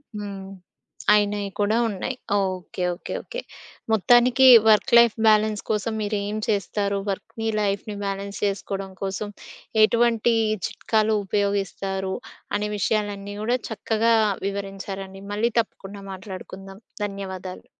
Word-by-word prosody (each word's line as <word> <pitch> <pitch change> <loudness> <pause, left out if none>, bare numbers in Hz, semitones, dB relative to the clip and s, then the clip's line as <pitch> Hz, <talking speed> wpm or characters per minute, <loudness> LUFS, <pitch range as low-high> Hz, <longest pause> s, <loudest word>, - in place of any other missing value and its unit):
హ్మ్. 200 -2 -6 0.6
అయినయి 205 -1 +1
కూడా 205 +2 +2
ఉన్నాయి. 215 +5 -3 0.2
ఓకె. 185 -1 -3
ఓకె. 175 - -7
ఓకె. - - -6 0.5
మొత్తానికి 240 +5 +5 0.2
వర్క్ 220 +4 +5
లైఫ్ 235 -2 +6
బ్యాలెన్స్ 215 -1 +4
కోసం 220 +1 0
మీరు 210 0 -1
ఏం 210 +1 -3
చేస్తారు? 200 -1 0
వర్క్‌ని, 225 +3 -4
లైఫ్‌ని 205 +1 -2
బ్యాలెన్స్ 200 0 -4
చేసుకోవడం 195 -1 -3
కోసం 195 +2 -3 0.6
ఎటువంటి 235 0 +3 0.3
చిట్కాలు 220 -1 +1
ఉపయోగిస్తారు, 195 -1 -1 0.4
అనే 210 0 -1
విషయాలన్నీ 205 +1 -1
గూడా 240 +4 +1
చక్కగా 225 +1 +1 0.3
వివరించారండి. 195 -1 -6
మళ్ళీ 225 +3 +1
తప్పకుండా 200 -3 -5
మాట్లాడుకుందాం. 195 0 -9 0.3
ధన్యవాదాలు. 190 -2 -6
205 Hz, 110 wpm, -24 LUFS, 195-215 Hz, 0.6 s, లైఫ్